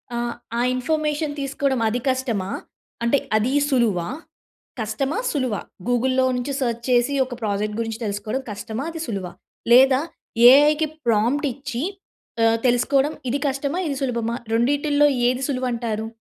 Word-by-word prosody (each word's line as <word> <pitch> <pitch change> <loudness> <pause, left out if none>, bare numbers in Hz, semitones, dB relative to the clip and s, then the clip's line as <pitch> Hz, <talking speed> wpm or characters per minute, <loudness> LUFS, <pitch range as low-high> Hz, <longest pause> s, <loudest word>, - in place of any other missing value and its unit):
ఆహ్, 240 0 -2 0.3
ఆ - - +2
ఇన్ఫర్మేషన్ 300 +2 -1
తీసుకోవడం 275 -1 -1
అది 240 +3 -1
కష్టమా? 240 -7 -1 0.5
అంటే 235 +4 +3 0.2
అది 235 +5 0 0.2
సులువా? 220 - +1 0.7
కష్టమా? 230 - -2
సులువా? 255 -8 -1 0.3
గూగుల్‌లో 255 +2 +2
నుంచి 255 +3 -3
సెర్చ్ 235 -2 -1
చేసి 245 +2 +3
ఒక 250 -1 -7
ప్రాజెక్ట్ 210 0 -1
గురించి 225 -1 -3
తెలుసుకోవడం 210 +5 -3
కష్టమా? 220 +4 -5
అది 325 -1 -6
సులువా? 195 -6 -4 0.4
లేదా 260 +2 +7 0.5
ఏఐకి 300 +3 +5 0.2
ప్రాంప్ట్ 235 +7 +2
ఇచ్చి 270 -1 -5 0.6
ఆహ్, 225 0 +4
తెలుసుకోవడం 270 +4 +2 0.2
ఇది 275 +4 0
కష్టమా? 280 +5 -2
ఇది 280 -2 -2
సులభమా? 235 -3 -1 0.2
రెండిటిలో 285 +5 +3 0.2
ఏది 255 +1 -1
సులువు 255 -2 -1
అంటారు? 225 -2 -3
250 Hz, 135 wpm, -22 LUFS, 225-280 Hz, 0.7 s, లేదా